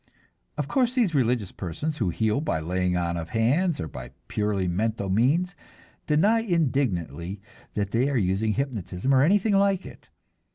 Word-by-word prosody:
Of 145 -2 -2
course 255 - +1
these 225 -10 +2
religious 120 -7 +1
persons 145 - -4
who 100 -6 +1
heal 110 - 0
by 150 - -1
laying 90 +2 0
on 85 -1 -1
of 85 -1 -5
hands 140 - +1
or 80 - -3
by 65 -3 -9
purely 105 -3 -1
mental 105 +2 -1
means 150 - +2 0.5
deny 200 +10 +4
indignantly 115 - -1 0.4
that 100 -1 -1
they 125 +5 +2
are 140 - 0
using 100 +2 +1
hypnotism 125 -3 -2
or 130 - +5
anything 200 +7 +3
like 195 -1 +2
it. - - -13
115 Hz, 160 wpm, -26 LUFS, -, 0.5 s, or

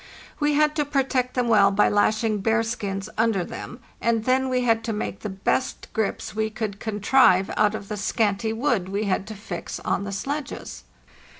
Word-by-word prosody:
We 295 -1 +2
had 300 0 +3
to 300 - +3
protect 265 -3 0
them 250 -2 +1
well 205 -3 +5
by 200 +1 +3
lashing 215 +1 +2
bearskins 220 -2 -1
under 220 -5 +2
them; - - -8 0.2
and 230 -1 +1
then 260 +1 +2
we 255 -1 +1
had 225 -2 +2
to 225 - -1
make 210 - -4
the 215 - -5
best 195 +7 -1
grips 220 -2 -2
we 220 0 0
could 215 -2 -4
contrive 205 -3 +3
out 210 0 +3
of 200 - -7
the 210 - -4
scanty 210 +1 0
wood 225 -5 0
we 200 +2 -1
had 195 -1 -1
to 220 - -7
fix 195 -4 -6
on 200 - -1
the 200 - -5
sledges. 280 +9 -5
220 Hz, 185 wpm, -24 LUFS, 200-250 Hz, 0.2 s, well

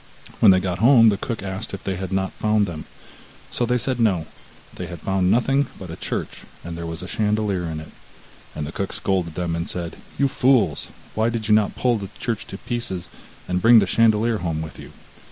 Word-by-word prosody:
When 110 - +7
they 95 -1 +7
got 90 -1 -2
home, 115 0 +7
the 105 - +2
cook 115 0 -4
asked 100 +2 -4
if 100 - -11
they 95 - -2
had 95 0 -5
not 95 0 0
found 105 -1 +1
them; 85 -4 -6 0.7
so 120 - 0
they 125 +1 +2
said 125 0 -1
no, 95 -8 +2 0.5
they - - -6
had 85 -2 -8
found 95 +1 +1
nothing 135 +6 +3
but 90 -3 -8
a - - -5
church, - - -4 0.2
and 85 0 -6
there 85 0 -5
was 80 +1 -6
a - - -6
chandelier 105 -4 0
in 80 -1 -4
it. 80 - -10 0.6
And 75 - -3
the 75 - -6
cook 100 +2 -3
scolded 90 -5 -1
them 85 -2 -1
and 85 0 -3
said: 85 -2 -5 0.2
'You 140 - +3
fools! 130 -3 +2 0.3
why 110 +1 +1
did 115 -2 -3
you - - +6
not 105 -1 +3
pull 120 -3 +1
the 100 -2 -6
church 115 -1 -3
to 100 - -7
pieces, 95 -7 -4 0.4
and 90 0 0
bring 115 +1 +8
the 105 - +6
chandelier 110 +2 +3
home 80 -3 -2
with 80 - -9
you? - - -10
100 Hz, 220 wpm, -23 LUFS, 90-115 Hz, 0.7 s, bring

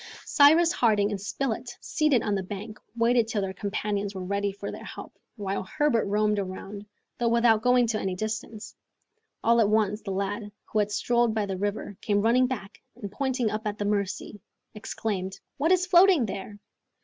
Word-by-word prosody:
Cyrus 320 +4 +6
Harding 210 - +2
and 200 -2 -4
Spilett, 240 +2 -3
seated 300 -6 +1
on 205 - 0
the 195 - 0
bank, 205 +3 -7 0.2
waited 235 0 +3
till 215 -3 -1
their 190 -1 -3
companions 205 +1 -3
were 190 - -4
ready 200 +1 -1
for 200 +1 -6
their - - -9
help, - - -9 0.2
while 200 -3 -3
Herbert 290 - +1
roamed 210 +1 +1
about, 195 +1 -6 0.4
though 240 - +1
without 230 -2 +4
going 250 +1 +4
to 220 -2 -1
any 190 -1 -2
distance. 215 +2 -5 0.7
All 235 +1 +4
at 205 - +3
once, 215 0 +1
the 205 - -7
lad, 200 +2 -3 0.2
who 215 - +3
had 210 0 0
strolled 235 +1 +1
by 215 -2 0
the 195 -1 -3
river, 205 0 -3
came 205 -1 +1
running 250 +3 +4
back, 225 -6 -6
and, 205 -5 -7
pointing 255 -1 -1
up 215 +1 -3
the 205 - -2
Mercy, 205 0 -2 0.3
exclaimed, 200 -3 -4 0.2
"What 315 +5 +1
is 365 -1 +4
floating 360 -6 +5
there?" 200 0 -6
215 Hz, 180 wpm, -27 LUFS, 200-235 Hz, 0.7 s, Cyrus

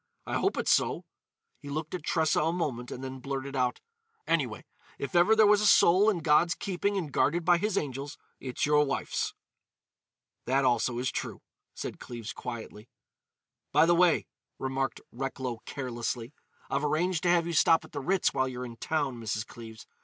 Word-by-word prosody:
"I - - -1
hope - - 0
it's - - +1
so." - - +2 0.5
He 145 - -10
looked 155 +2 -4
at 180 - -3
Tressa 160 -1 +2
a 160 +2 +1
moment 135 -9 -3
and 130 - -7
then 130 0 -6
blurted 135 +1 -4
out: 125 -2 0 0.5
"Anyway, - - -1 0.3
if - - -5
ever 175 +5 +5
there 220 0 +6
was 210 0 +5
a 210 - +3
soul 195 +2 +6
in 185 -6 0
God's 165 +2 +4
keeping 200 +1 -1
and 165 -6 -3
guarded 165 +5 +1
by 175 0 +5
His 210 +1 0
angels, 140 -2 -3 0.2
it's 130 -2 -2
your 150 0 +4
wife's!" 135 -2 -2 1.1
"That 135 +2 +2
also 120 -1 +2
is 125 +1 -1
true," - - -5 0.3
said - - -6
Cleves 115 -2 -7
quietly. 115 -2 -8 0.8
"By 150 +3 +5
the 175 - +4
way," 175 -1 +4 0.3
remarked 135 0 -2
Recklow 130 -2 -4
carelessly, 120 -1 -4 0.3
"I've 140 +2 -1
arranged 160 +3 +1
to 175 - +1
have 170 -1 +4
you 170 - -3
stop 165 0 +4
at 155 - -17
the 145 - -4
Ritz 185 +7 +1
while 130 - +1
you're 125 -1 -5
in 115 -1 -9
town, 140 -3 -1
Mrs. 110 -1 -2
Cleves. 110 -2 -11
140 Hz, 180 wpm, -29 LUFS, 125-170 Hz, 1.1 s, there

